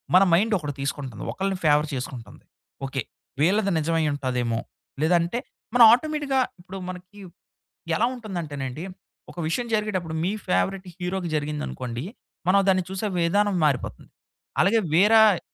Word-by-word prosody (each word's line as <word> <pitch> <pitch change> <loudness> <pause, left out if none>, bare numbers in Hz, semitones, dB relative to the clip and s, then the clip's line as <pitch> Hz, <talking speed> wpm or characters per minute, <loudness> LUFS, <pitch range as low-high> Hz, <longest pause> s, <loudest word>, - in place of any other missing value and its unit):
మన 185 - +8
మైండ్ 210 +6 +3
ఒకటి 145 -3 -4
తీసుకుంటుంది. 140 -4 -4
ఒకళ్ళని 195 0 -2
ఫేవర్ 150 0 +4
చేసుకుంటుంది. 125 -2 -7 0.4
ఓకే! 135 -1 -3 0.4
వీళ్ళది 200 +5 +3
నిజమై 165 +1 +1
ఉంటదేమో? 125 -4 -1 0.4
లేదంటే 170 +6 +2 0.4
మన 245 - +5
ఆటోమేటిక్‌గా 290 -1 +1 0.2
ఇప్పుడు 185 +2 -9
మనకి 180 +2 -10 0.7
ఎలా 220 - +3
ఉంటుందంటేనండి? 160 - -5 0.5
ఒక - - -19
విషయం 240 +9 -1
జరిగేటప్పుడు 195 -6 -1
మీ 185 - +1 0.2
ఫేవరెట్ 190 +1 0
హీరోకి 180 0 -2
జరిగిందనుకోండి, 145 -5 -3 0.4
మనం 195 +2 +5
దాన్ని 185 -1 +3
చూసే 190 +3 -2
విధానం 200 +4 +2
మారిపోతుంది. 125 - -2 0.5
అలాగే 225 +4 +4
వేరాయ్ 210 +1 +6
180 Hz, 125 wpm, -25 LUFS, 150-205 Hz, 0.7 s, మన